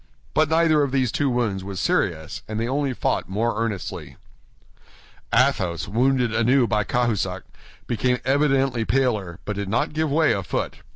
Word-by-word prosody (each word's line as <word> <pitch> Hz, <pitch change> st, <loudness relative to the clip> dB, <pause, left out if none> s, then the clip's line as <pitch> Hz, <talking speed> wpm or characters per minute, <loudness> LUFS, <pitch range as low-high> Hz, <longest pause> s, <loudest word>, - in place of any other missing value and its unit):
But 155 Hz, -1 st, +3 dB
neither 160 Hz, -2 st, +3 dB
of 140 Hz, -2 st, 0 dB
these 130 Hz, -4 st, +1 dB
two 145 Hz, -, 0 dB
wounds 115 Hz, -6 st, -1 dB
was 95 Hz, -1 st, -5 dB
serious, 80 Hz, -5 st, -1 dB
and 110 Hz, 0 st, -4 dB
they 115 Hz, -, -1 dB
only 140 Hz, +1 st, 0 dB
fought 125 Hz, -, -1 dB
more 115 Hz, +3 st, 0 dB
earnestly. 105 Hz, -6 st, -5 dB, 1.1 s
Athos, 100 Hz, -, +1 dB
wounded 125 Hz, +2 st, +1 dB
anew 120 Hz, +3 st, +3 dB
by 105 Hz, -1 st, +1 dB
Cahusac, 120 Hz, -1 st, -1 dB, 0.4 s
became 125 Hz, +1 st, 0 dB
evidently 135 Hz, -3 st, +2 dB
paler, 110 Hz, -9 st, 0 dB
but 105 Hz, -1 st, -4 dB
did 100 Hz, -1 st, -3 dB
not 115 Hz, +7 st, 0 dB
give 155 Hz, 0 st, 0 dB
way 155 Hz, +2 st, +3 dB
a 100 Hz, -, -2 dB
foot. 90 Hz, -, -3 dB
120 Hz, 160 wpm, -23 LUFS, 105-135 Hz, 1.1 s, But